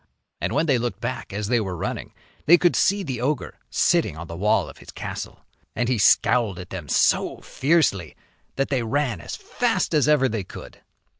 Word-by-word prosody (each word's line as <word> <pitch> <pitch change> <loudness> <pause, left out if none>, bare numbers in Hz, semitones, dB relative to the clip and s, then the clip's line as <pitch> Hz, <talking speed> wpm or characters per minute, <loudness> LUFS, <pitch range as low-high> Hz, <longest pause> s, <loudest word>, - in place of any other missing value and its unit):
And - - -1
when 155 +3 +2
they 135 -6 +2
looked 120 0 -3
back - - -4
as 100 +1 -3
they 120 +1 +2
were 95 -5 -3
running, - - -4 0.4
they 175 +3 +8
could 175 0 +2
see 200 0 +2
the 130 -7 -4
ogre 140 +1 -2
sitting 75 - +2
on 85 - -6
the 85 - -8
wall 105 +5 +2
of - - -12
his - - -15
castle. - - -7 0.3
And 120 - 0
he 125 -4 +1
scowled 105 -1 +3
at 90 0 -9
them 85 -7 -7
so - - +2
fiercely 135 - +1 0.4
that 135 - -1
they 135 -3 +1
ran 120 - -1
as 80 - -6
fast - - -1
as 150 -3 +3
ever 150 -3 +4
they 110 -4 -3
could. - - -11
120 Hz, 200 wpm, -23 LUFS, 95-145 Hz, 0.4 s, they